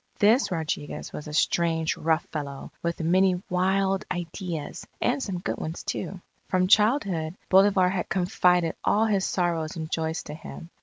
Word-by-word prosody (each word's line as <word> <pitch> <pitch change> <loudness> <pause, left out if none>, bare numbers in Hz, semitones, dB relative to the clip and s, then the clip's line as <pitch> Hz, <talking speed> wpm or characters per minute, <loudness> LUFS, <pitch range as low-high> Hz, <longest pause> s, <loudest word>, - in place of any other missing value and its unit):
This 225 +6 +4
Rodriguez 160 -4 -4
was 150 - -7
a - - -6
strange, 160 0 +1
rough 160 +1 0
fellow, 140 -3 -5
with 170 0 -2
many 180 +2 +3
wild 190 +2 +1
ideas 175 -2 -5
and - - +1
some 195 -7 -3
good 175 - -3
ones 160 +2 -5
too. 195 - -4 0.3
From 185 -1 +2
childhood, 195 - +3
Bolivar 195 -1 +5
had 185 -2 -2
confided 180 -2 +2
all 215 +2 +3
his 200 -3 +1
sorrows 170 -3 -1
and 160 -1 -5
joys 160 0 -2
to 150 - -8
him. 165 +2 -10
175 Hz, 155 wpm, -26 LUFS, 160-190 Hz, 0.3 s, Bolivar